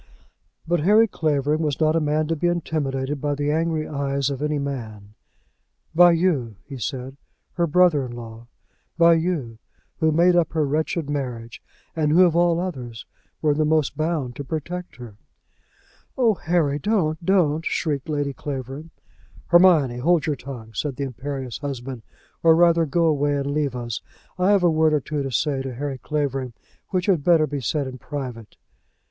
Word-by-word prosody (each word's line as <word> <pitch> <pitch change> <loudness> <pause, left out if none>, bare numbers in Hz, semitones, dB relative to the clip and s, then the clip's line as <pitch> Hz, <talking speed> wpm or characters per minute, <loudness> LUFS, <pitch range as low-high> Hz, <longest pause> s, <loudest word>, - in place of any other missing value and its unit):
But 175 +1 +1
Harry 210 +8 +5
Clavering 150 -4 0
was 150 -3 -1
not 155 0 +3
a - - +3
man 155 0 0
to 165 - +1
be 170 +3 0
intimidated 145 -5 -2
by 145 -1 -1
the 145 +1 -1
angry 160 0 0
eyes 140 -1 -1
of 140 0 -5
any 150 0 0
man. 110 -8 -6 0.8
"By 175 +1 +7
you," 155 - 0
he 135 -3 -8
said, 130 +3 -5 0.4
"her 170 -1 0
brother 165 -3 +4
in 125 -2 -7
law; 115 -1 -10 0.5
by 170 0 +6
you, 160 -9 -2 0.4
who 160 -1 +3
made 175 +3 +4
up 170 -2 +2
her 155 -2 +1
wretched 155 +2 -1
marriage, 120 -5 -5 0.3
and 155 -2 +1
who, 180 +4 +6
of 170 -2 +1
all 170 -1 +3
others, 125 -10 -5 0.4
were 150 -1 +3
the 155 +1 +1
most 155 -2 +1
bound 155 -6 -2
to 140 - -4
protect 170 +5 -5
her." 120 -5 -11 1.0
"Oh, 235 -4 +4
Harry, 160 -5 0
don't, 160 -4 0
don't!" 165 -4 +2
shrieked 150 -3 -2
Lady 145 -2 -1
Clavering. 135 +3 -6 0.6
"Hermione, 165 -8 +5
hold 170 +4 +2
your 150 - 0
tongue," 120 -4 -9
said 140 +5 -3
the 140 - -3
imperious 130 -1 -5
husband; 135 -3 -5 0.4
"or, 165 -1 +6
rather, 170 -1 +4
go 170 +4 +1
away 145 -2 +2
and 140 0 -2
leave 145 -3 -1
us. 120 -3 -4 0.4
I 180 +2 +3
have 200 -3 +4
a 175 - +4
word 155 0 +3
or - - +2
two 145 +2 -4
to 135 -1 -4
say 135 +3 0
to 135 -2 -6
Harry 135 0 -4
Clavering, 135 -3 -2 0.4
which 185 -1 -1
had 185 -8 +2
better 165 -2 +4
be 145 -1 -4
said 140 +4 -1
in 130 -1 -7
private." 125 -7 -7
150 Hz, 175 wpm, -23 LUFS, 135-165 Hz, 1.0 s, By